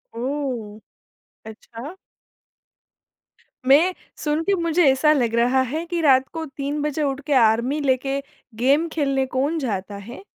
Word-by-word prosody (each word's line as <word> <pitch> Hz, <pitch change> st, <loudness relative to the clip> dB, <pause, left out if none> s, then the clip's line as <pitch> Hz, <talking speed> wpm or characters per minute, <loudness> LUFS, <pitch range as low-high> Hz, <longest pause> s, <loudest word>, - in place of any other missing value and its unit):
ओह! 245 Hz, -4 st, -4 dB, 0.7 s
अच्छा। 230 Hz, -, -10 dB, 1.7 s
मैं, 315 Hz, +7 st, +5 dB, 0.2 s
सुन 300 Hz, +1 st, -1 dB
के 400 Hz, -, +1 dB
मुझे 335 Hz, +1 st, +2 dB
ऐसा 285 Hz, +3 st, +3 dB
लग 240 Hz, -6 st, 0 dB
रहा 245 Hz, +3 st, +3 dB
है 320 Hz, +3 st, -3 dB
कि 345 Hz, -2 st, -1 dB
रात 265 Hz, -3 st, +4 dB
को 325 Hz, -1 st, -4 dB
3 285 Hz, +1 st, -4 dB
बजे 300 Hz, +1 st, -1 dB
उठ 275 Hz, -1 st, -1 dB
के 295 Hz, -, 0 dB
आर्मी 240 Hz, +3 st, +3 dB
लेके 270 Hz, 0 st, 0 dB, 0.4 s
गेम 275 Hz, +8 st, +2 dB
खेलने 275 Hz, -3 st, 0 dB
कौन 285 Hz, +6 st, +1 dB
जाता 205 Hz, -7 st, -3 dB
है? 240 Hz, -, -9 dB
275 Hz, 140 wpm, -22 LUFS, 245-300 Hz, 1.7 s, मैं